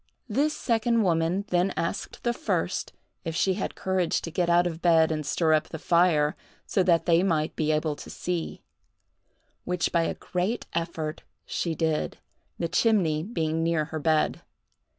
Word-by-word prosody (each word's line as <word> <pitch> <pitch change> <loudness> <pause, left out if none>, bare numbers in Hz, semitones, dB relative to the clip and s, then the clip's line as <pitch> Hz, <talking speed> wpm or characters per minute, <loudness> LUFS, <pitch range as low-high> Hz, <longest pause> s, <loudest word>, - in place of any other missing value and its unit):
This 300 +2 +1
second 230 -1 +1
woman 170 +2 +1
then 180 +2 +1
asked 170 +4 -3
the 240 - +1
first 310 +6 -2 0.3
if 165 -2 -4
she 190 +2 +2
had 195 - -4
courage 190 -3 0
to 165 - -6
get 175 +1 0
out 175 +1 +4
of 170 -1 -3
bed 165 -2 +4
and 155 -1 -2
stir 160 +2 +2
up 155 - +1
the 160 - -5
fire, 160 -3 +3 0.3
so 195 - +1
that 175 -2 +3
they 170 0 +4
might 160 -5 0
be 155 -1 +1
able 155 0 0
to - - -10
see; 175 -2 -4 1.0
which 180 -1 -1
by 170 - +3
a - - -2
great 185 +7 -2
effort 165 -2 -3 0.2
she 165 -2 -2
did, 160 -2 -1 0.4
the 170 - -1
chimney 175 -7 +2
being 165 -4 -1
near 165 -2 +1
her 155 - -1
bed. 155 0 +1
170 Hz, 170 wpm, -27 LUFS, 160-185 Hz, 1.0 s, out